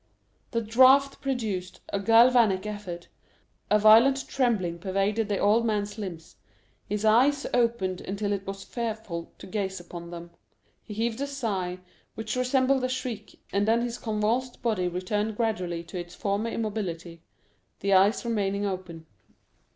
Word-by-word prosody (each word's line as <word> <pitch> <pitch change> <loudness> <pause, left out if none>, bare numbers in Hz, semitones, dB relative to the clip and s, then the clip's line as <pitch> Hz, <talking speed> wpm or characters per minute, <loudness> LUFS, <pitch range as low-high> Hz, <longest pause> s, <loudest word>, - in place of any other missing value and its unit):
0255m - - -42
The 230 - +1
draught 265 +3 +5
produced 220 -9 -3
a 200 - -1
galvanic 225 -2 +5
effect, 205 -5 -6 0.6
a 210 - +5
violent 230 +6 +6
trembling 210 -10 0
pervaded 200 +3 0
the 200 - 0
old 215 +4 +3
man's 210 -1 -1
limbs, 175 -6 -7 0.5
his 210 +1 -2
eyes 265 +6 +4
opened 230 -7 +1
until 200 +1 -3
it 195 -1 -4
was 195 0 -5
fearful 220 -8 -5
to - - -11
gaze 190 -1 -3
upon 175 -1 -9
them, 170 0 -9 0.5
he 210 - -9
heaved 225 +3 -1
a 280 - -1
sigh 200 -10 -3 0.4
which 220 +1 -4
resembled 260 +1 +2
a 255 - 0
shriek, 240 -4 -5
and 200 +1 +1
then 230 +1 +3
his 240 0 -4
convulsed 225 +3 -1
body 215 -7 +1
returned 205 +4 -2
gradually 180 -7 -1
to 175 +2 -7
its 175 0 -8
former 205 +2 -1
immobility, 180 -7 -4 0.6
the 200 0 +2
eyes 195 +5 +4
remaining 205 -3 0
open. 180 -4 -5
210 Hz, 150 wpm, -27 LUFS, 190-235 Hz, 0.6 s, violent